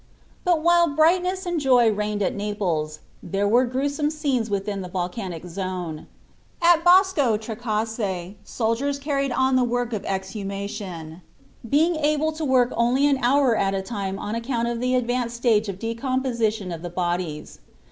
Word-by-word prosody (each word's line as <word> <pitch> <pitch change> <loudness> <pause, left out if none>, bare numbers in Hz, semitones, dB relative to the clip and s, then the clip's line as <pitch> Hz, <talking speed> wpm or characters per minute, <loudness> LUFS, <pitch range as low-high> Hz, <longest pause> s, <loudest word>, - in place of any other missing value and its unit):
But 340 -3 +2
while 345 0 +5
brightness 360 +5 +2
and 350 -2 -1
joy 250 -5 +4
reigned 210 0 -1
at - - 0
Naples, 180 -7 -2 0.2
there 200 +1 -1
were 240 +5 +4
gruesome 285 +4 -1
scenes 280 -7 -1
within 200 0 -2
the 180 - -7
volcanic 180 -1 -4
zone. 180 -3 -5 0.5
At 340 -1 +4
Bosco 350 - +5
Trecase 215 -4 -3
soldiers 235 +6 -1
carried 275 -1 -1
on 260 +2 +2
the 255 - +4
work 245 0 -1
of 210 - -3
exhumation, 195 -3 -5 0.5
being 320 +6 +3
able 305 +1 +1
to 315 0 -6
work 255 -3 +3
only 245 +4 +2
an 280 -2 +3
hour 260 -1 +3
at 195 -2 +1
a 190 - -2
time 195 -2 -4
on 205 +2 -4
account 235 0 -1
of 235 -1 -2
the 250 +1 +1
advanced 245 -1 -1
stage 225 -3 +2
of 190 - -5
decomposition 230 -3 -1
of 165 -1 -6
the 175 - -5
bodies. 175 -3 -3
230 Hz, 155 wpm, -24 LUFS, 195-275 Hz, 0.5 s, while